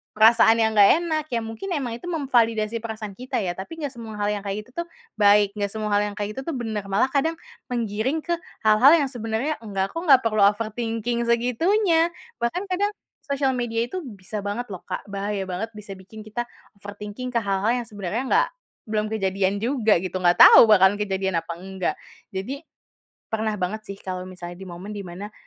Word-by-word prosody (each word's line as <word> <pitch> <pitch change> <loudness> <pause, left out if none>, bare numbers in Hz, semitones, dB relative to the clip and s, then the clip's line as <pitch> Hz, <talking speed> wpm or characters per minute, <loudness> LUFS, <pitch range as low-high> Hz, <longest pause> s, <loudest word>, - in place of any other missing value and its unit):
perasaan 225 +1 +6
yang 220 -1 +2
enggak 205 -1 +7
enak. 315 -3 -1
Iya 235 - +1
mungkin 225 - -6
emang 245 -6 -3
itu - - -23
memvalidasi 230 -8 +1
perasaan 220 -2 -5
kita 255 +4 -3
ya, 175 - -1
tapi 195 +13 -8
enggak 285 -3 -4
semua 225 -2 -8
hal 205 - 0
yang 205 -1 -5
kayak 205 +2 -4
gitu 255 +7 -5
tuh - - -23 0.3
baik, 205 0 +5
enggak 200 -1 -2
semua 215 -1 -3
hal 205 - +4
yang 205 - -7
kayak 210 0 -3
gitu - - -2
tuh 320 - -2
benar. 220 -4 -3
Malah 200 +7 +3
kadang 320 +4 +1 0.4
menggiring 235 +5 -1
ke 345 - 0 0.3
hal-hal 215 +6 +7
yang 285 -3 +1
sebenarnya, 235 +5 -2
"Enggak 195 -3 -2
kok, 330 - -2
enggak 270 -3 +8
perlu 215 -2 +2
overthinking 230 +2 -1
segitunya." 330 - +2 0.3
Bahkan 235 +11 -1
kadang 405 +3 0 0.3
sosial 275 -2 0
media 235 -1 -1
itu 370 +3 -5
bisa 205 -4 -7
banget 210 +5 -3
loh, 180 - -8
Kak, - - -6
bahaya 200 -1 -3
banget 195 +5 -4
bisa 200 -2 -8
bikin 190 +4 -13
kita 240 +3 -3 0.3
overthinking 205 +5 -7
ke 235 - +1
hal-hal 200 +1 0
yang - - -16
sebenarnya 205 +3 -3
enggak 460 - +3 0.4
belum 215 0 0
kejadian 195 -1 0
juga 235 -4 +3
gitu, 185 0 -3
enggak 175 -1 +4
tahu - - +10
bahkan 205 -1 +5
kejadian 190 -3 0
apa 170 - -7
enggak. 190 +1 -3 0.4
Jadi, 255 +9 -4 0.7
pernah 220 -1 0
banget 200 +4 -3
sih 200 - -6
kalau 185 -1 -5
misalnya 175 -1 -8
di 190 - -8
momen 180 +4 -8
di 205 - -5
mana, 200 +5 -8
220 Hz, 195 wpm, -24 LUFS, 200-245 Hz, 0.7 s, tahu